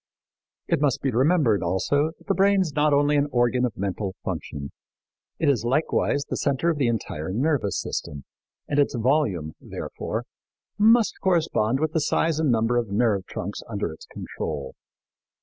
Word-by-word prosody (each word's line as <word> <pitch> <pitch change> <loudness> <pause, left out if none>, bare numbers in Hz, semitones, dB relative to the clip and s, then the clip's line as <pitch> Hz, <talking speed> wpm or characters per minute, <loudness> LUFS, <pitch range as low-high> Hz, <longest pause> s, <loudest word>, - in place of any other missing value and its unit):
It - - +1
must 145 -4 +1
be 135 - +1
remembered, 130 - +3
also, 145 - +1
that - - -22
the 195 - +1
brain 195 0 +4
is 165 -6 -2
not 150 0 +3
only 145 +1 +3
an 145 0 +2
organ 120 0 +2
of 120 - -4
mental 95 0 -3
function. 70 -1 -5 0.7
It 160 - 0
is 135 -6 +2
likewise 140 +2 +1
the - - -4
center 140 +4 +1
of 155 - -4
the 130 - +2
entire 95 -9 -3
nervous 125 - 0
system, 70 -2 -5 0.4
and 145 - 0
its 140 - +2
volume, 115 - +1
therefore, - - -5 0.6
must 225 +1 +4
correspond 155 - +1
with 155 +1 0
the 160 - 0
size 160 +1 +1
and 155 -5 +2
number 115 +1 +2
of 120 -3 -1
nerve 100 -2 +1
trunks 100 +3 -5
under 100 -6 -2
its 80 - -14
control. 70 -4 -5
130 Hz, 165 wpm, -25 LUFS, 105-150 Hz, 0.7 s, brain